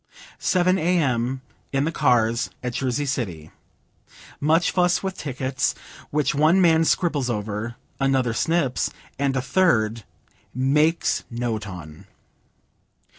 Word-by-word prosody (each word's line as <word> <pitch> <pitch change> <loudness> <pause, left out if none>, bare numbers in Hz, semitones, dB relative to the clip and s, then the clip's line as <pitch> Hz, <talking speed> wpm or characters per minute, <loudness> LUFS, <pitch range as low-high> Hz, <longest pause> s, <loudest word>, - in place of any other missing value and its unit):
Seven 185 +1 +2
A.M. 135 -8 +1 0.3
In 135 0 +1
the 160 - 0
cars, 120 -4 +2
at 125 -1 -3
Jersey 135 +3 -1
City. 90 - -4 0.9
Much 160 +4 +2
fuss 180 0 +2
with 190 -1 -3
tickets, 130 -2 -2 0.3
which 150 -2 +1
one 155 +6 +4
man 165 -3 +4
scribbles 150 -5 +1
over, 105 +1 -3 0.2
another 135 -3 +1
snips, 150 0 0 0.3
and 140 -1 +1
a 130 - 0
third 115 - +2 0.5
"makes 150 +6 +2
note 115 -3 -3
on." 90 0 -10
135 Hz, 115 wpm, -23 LUFS, 115-160 Hz, 0.9 s, one